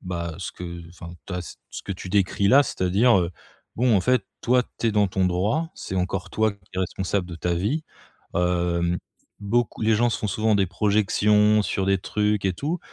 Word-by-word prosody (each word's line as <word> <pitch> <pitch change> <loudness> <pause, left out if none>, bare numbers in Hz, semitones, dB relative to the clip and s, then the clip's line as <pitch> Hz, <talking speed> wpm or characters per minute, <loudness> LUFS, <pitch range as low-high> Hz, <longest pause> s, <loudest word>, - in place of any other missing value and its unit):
bah, 85 -3 -4
ce 90 - -5
que 85 -1 -8
enfin 85 0 -10
tu 95 - -5
as 90 - -3
ce - - -10
ce - - -7
que - - -4
tu 90 0 -8
décris-là, 100 +7 +4
c'est-à-dire, 100 +2 +3
heu, 85 -1 0 0.5
bon, 120 0 +3
en 100 - +4
fait, 125 +7 +2 0.2
toi, 125 +1 +3 0.2
tu 115 - 0
es - - +3
dans 105 -1 +3
ton 95 0 0
droit, 105 - 0
c'est - - -6
encore 95 +1 -2
toi 110 0 +2
qui 100 - -20
est 90 - -4
responsable 95 0 -1
de 90 - -7
ta 85 +1 -2
vie, 105 - -1 0.5
hem, 85 -1 +1 0.4
beaucoup 115 +3 0
les 110 0 +4
gens 120 +2 +3
se 115 - -1
font 105 - -2
souvent 110 +3 +1
des 100 -1 +3
projections 105 +2 +3
sur 95 - -1
des 95 0 +2
trucs 105 +1 0
et 95 - +2
tout, 150 - -3
100 Hz, 210 wpm, -24 LUFS, 90-110 Hz, 0.5 s, décris-là